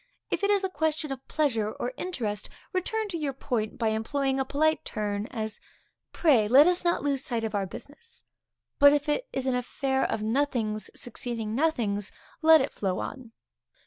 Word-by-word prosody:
If - - -1
it 400 - +3
is 405 -1 +3
a 380 - 0
question 310 -2 -1
of 265 0 -7
pleasure 230 -9 0
or 250 - -4
interest, 225 - -3 0.2
return 435 +4 -1
to 340 -3 -3
your 285 -3 -2
point 235 -4 -2
by 225 -3 +1
employing 265 +5 0
a 265 - +1
polite 310 +4 +1
turn, 210 0 -3
as, 220 -5 -4 0.5
Pray 260 -11 +4
let 270 +7 +8
us 360 +1 +2
not 345 -4 +1
lose 280 -2 0
sight 235 -2 -1
of 220 -1 -2
our 200 -2 0
business. 380 - -10 0.6
But 285 0 +8
if 295 +1 0
it 400 +12 0
is 265 - -2
an 260 - +1
affair 265 +2 0
of 215 - -1
nothings 220 -4 0
succeeding 230 -2 -3
nothings, 230 -8 0 0.3
let 320 -1 +7
it 265 - -2
flow 190 -3 -1
on. 250 -4 -6
265 Hz, 180 wpm, -28 LUFS, 220-305 Hz, 0.6 s, let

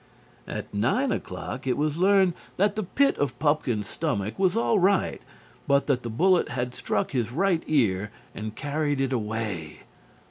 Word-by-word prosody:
At 105 - -6
nine 130 - +1
o'clock 130 +1 -5
it 125 - +1
was 150 +2 0
learned 190 -1 +4 0.2
that 200 +2 +3
the 215 - -1
pit 275 +9 +1
of 135 -4 -1
Pupkin's 135 -8 0
stomach 115 - -2
was 190 +2 +2
all 230 -2 +3
right, 190 0 +2 0.5
but 140 0 +3
that 135 -3 +1
the 120 - -5
bullet 180 +10 +3
had 125 0 -3
struck - - -1
his 120 -4 -1
right 175 +3 +1
ear 105 -9 +2 0.2
and 110 0 -6
carried 145 0 -1
it 135 -1 0
away. 105 -8 -3
140 Hz, 165 wpm, -26 LUFS, 115-180 Hz, 0.5 s, learned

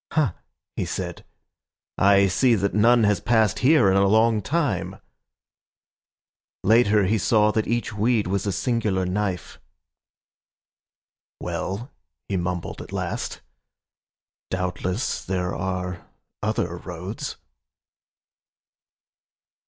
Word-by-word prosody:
"Ha," 155 -8 +2 0.4
he - - -1
said,"I 100 0 -1
see 115 +6 +3
that 100 -1 -1
none 115 +3 +5
has 105 -1 +3
passed 110 -1 +2
hereIn 125 -9 +4
a 100 0 +4
long 110 +1 +3
time."Later 110 - -2
he 110 +3 +1
saw 105 +2 +3
that 110 0 -1
each 120 0 -1
weedWas 105 -3 0
a - - +1
singular 105 -4 0
knife."Well," 100 - -8 0.4
he 100 - -2
mumbled 90 -1 -3
at - - -11
last,"Doubtless 90 +3 -5
there 90 -1 -2
are 90 -1 -3 0.4
other 105 -5 -1
roads." 90 +4 -6
100 Hz, 85 wpm, -24 LUFS, 95-115 Hz, 0.4 s, none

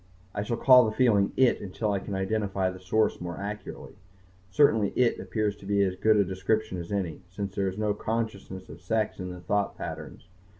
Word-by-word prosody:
I 100 - -2
shall 115 +3 -2
call 125 -1 +7
the 110 - 0
feeling 105 -6 +3
"it" 130 -2 +4
until 105 +2 -2
I 100 - 0
can 100 +1 -5
identify 95 -1 -1
the 95 - -10
source 95 +3 +1
more 85 -1 -5
accurately. 105 0 -7 0.5
Certainly 110 -1 +3
"it" 125 -2 +2
appears 105 -2 -1
to 100 - -12
be 100 0 +3
as 95 -1 0
good 110 +3 +3
a 100 - +4
description 95 +1 -1
as 85 +2 -7
any, 95 -5 -2
since 95 +1 -5
there 100 -1 0
is 95 +1 -4
no 105 -1 +1
consciousness 105 -4 -4
of 80 +3 -12
sex 105 +3 -1
in 90 0 -4
the 90 -1 -8
thought 100 +2 -1
patterns. - - -7
100 Hz, 205 wpm, -27 LUFS, 95-110 Hz, 0.5 s, call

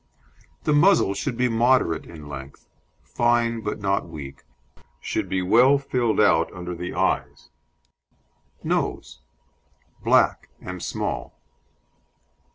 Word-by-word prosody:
The 150 - +1
muzzle 145 - +4
should 120 +4 -3
be 125 - +2
moderate 115 -8 +2
in 75 -3 -11
length, 70 -1 -10 0.4
fine 120 -1 +1
but 105 - -3
not 100 0 -1
weak, 70 -3 -9 0.6
should - - -3
be 95 -1 -1
well 125 +9 +5
filled 125 -5 -1
out 80 -5 +3
under 90 0 -6
the 90 +1 -6
eyes. - - -1 1.1
NOSE - - -2 0.8
Black - - +3
and 90 -1 -7
small. - - -4
100 Hz, 110 wpm, -24 LUFS, 85-120 Hz, 1.1 s, well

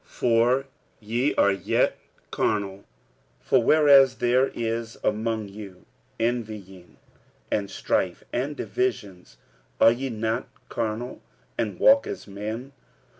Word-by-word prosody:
46:003:003 - - -30
For 120 +3 +3 0.3
ye 120 +6 -1
are 100 - +4
yet 95 - 0 0.3
carnal: 100 -2 -1 0.5
for 130 - +2
whereas 140 -2 +6
there 125 +2 +2
is 115 -1 -4
among 110 0 -1
you 100 -2 -11 0.3
envying, 110 -6 -4 0.5
and 100 -2 -1
strife, - - -1
and 140 +4 -2
divisions, 95 - -3 0.4
are 115 - +7
ye 130 +3 -3
not 115 +1 -2 0.2
carnal, 115 +2 -4 0.3
and 110 -3 -3
walk 275 +1 +5
as - - -6
men? 110 +6 -6
115 Hz, 115 wpm, -25 LUFS, 105-125 Hz, 0.5 s, are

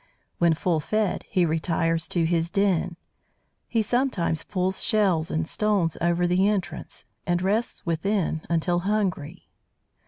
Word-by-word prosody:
When 170 -2 +4
full 165 0 0
fed, 215 +4 -1
he 180 -2 +2
retires 165 0 0
to 170 - 0
his 165 0 0
den; 185 -3 +1 0.7
he 225 -2 +1
sometimes 215 - 0
pulls 190 0 -1
shells 190 -7 +2
and 160 0 -1
stones 200 -6 +1
over 175 +1 +2
the 180 +3 +3
entrance, 205 -4 -3 0.2
and 175 0 +2
rests 205 +6 -1
within 170 0 0
until 170 +1 +1
hungry. 190 -6 -2
175 Hz, 130 wpm, -25 LUFS, 165-200 Hz, 0.7 s, When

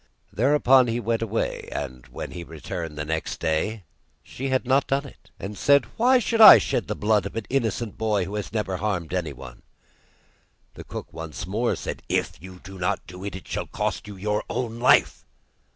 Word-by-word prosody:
Thereupon 130 0 +4
he 115 +1 -1
went 115 -1 -1
away, 115 0 -2
and 65 0 -6
when 60 - -7
he 90 - -7
returned 80 0 -6
next 80 +2 -3
day 95 +7 -1 0.4
she 135 +1 -5
had 130 0 0
not 130 +2 +2
done 140 +1 0
it, 140 - -15
and 100 +2 -6
said: 140 +6 +4
'Why 255 +3 +4
should 230 -1 +1
I 215 - +12
shed - - -1
the - - -2
blood 105 -2 +1
of - - -11
an 115 -2 -3
innocent 115 -4 -1
boy 105 -4 +1
who 100 - -7
has 105 -1 -4
never 105 -4 -2
harmed 90 -4 -2
anyone?' 70 -8 -5 1.1
The - - -11
cook - - -8
once 80 0 -6
more 110 +6 0
said: - - -6
'If - - -1
you 95 0 -11
do 95 -1 -10
not 90 - -1
do 90 +1 -10
it, 100 -2 -5
it 95 - -9
shall - - -3
cost - - -3
you 105 - -8
your 105 +2 -1
own 120 -2 -3
life. 125 - +4
105 Hz, 190 wpm, -24 LUFS, 90-120 Hz, 1.1 s, I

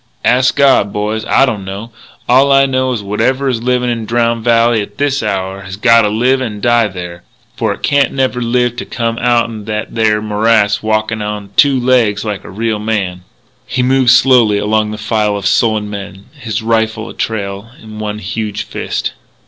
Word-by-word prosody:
"Ask 130 +1 +3
God, 135 -7 +3
boys. 105 +2 -2
I 135 - +4
don't 110 -7 -3
know. 100 +5 -7 0.4
All 135 +3 +4
I 135 0 +5
know 130 -1 0
is 120 -4 -2
that - - -12
whatever 130 +7 0
is 120 -4 -1
livin' 125 0 0
in 115 -2 -4
Drowned 115 0 0
Valley 115 -1 +3
at 100 - -9
this 145 -1 0
hour 95 -2 -3
has 95 -1 -8
gotta 115 0 +4
live 125 +5 +1
and 110 -5 -4
die 120 0 +2
there. 90 -3 -8 0.3
For - - -1
it - - -7
can't 140 -3 +2
never 130 -2 -1
live 120 0 0
to - - -5
come 115 -1 -2
outen 115 -3 0
that 105 0 -4
there 110 -2 +2
morass 105 0 +1
walkin' 110 0 -1
onto 105 -1 -5
two 140 +1 +4
legs 120 -4 +1
like 105 -2 -4
a - - -11
real 110 +2 -2
man." 100 -5 -3 0.4
He 125 0 -1
moved 130 0 +3
slowly 125 -4 +5
along 105 +1 0
the 105 - -5
file 105 -1 0
of 100 - -6
sullen 110 -2 +1
men, 100 -1 -8
his 110 -7 -5
rifle 110 0 0
a - - -9
trail 100 -1 -4
in 110 -1 -11
one 105 -1 -4
huge 105 +1 -4
fist. - - -4
110 Hz, 190 wpm, -14 LUFS, 105-125 Hz, 0.4 s, I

